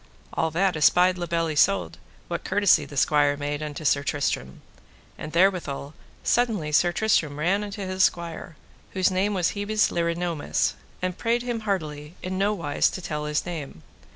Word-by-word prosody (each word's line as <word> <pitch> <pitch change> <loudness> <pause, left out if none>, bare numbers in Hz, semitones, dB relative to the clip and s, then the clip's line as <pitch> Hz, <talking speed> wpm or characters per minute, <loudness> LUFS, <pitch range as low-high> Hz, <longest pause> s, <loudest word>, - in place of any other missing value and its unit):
All 160 - 0
that 180 +3 +1
espied 180 +4 +4
La 175 - -3
Beale 165 0 0
Isoud, 170 +6 +2 0.3
what - - -4
courtesy 190 -6 +3
the 145 0 -10
squire 145 0 +3
made 145 +1 -3
unto 150 0 -6
Sir 140 -1 +3
Tristram. 140 - -2 0.5
And 155 - -7
therewithal 170 -6 +1 0.3
suddenly 220 -11 +1
Sir 175 +4 +4
Tristram 165 -7 +1
ran 185 +7 +1
unto 200 -1 -5
his 185 0 +1
squire, 170 -1 -1 0.4
whose 190 -1 +2
name 195 +3 0
was 180 -3 +2
Hebes 210 +1 +1
le 170 - 0
Renoumes, 170 -2 -1 0.3
and 185 -1 -2
prayed 235 +1 +1
him 240 -2 -2
heartily 155 -7 -3
in 185 +1 -3
no 200 +2 +2
wise 165 -8 +1
to - - -6
tell 150 -4 -4
his 150 0 -1
name. 150 - -7
170 Hz, 170 wpm, -25 LUFS, 150-195 Hz, 0.5 s, espied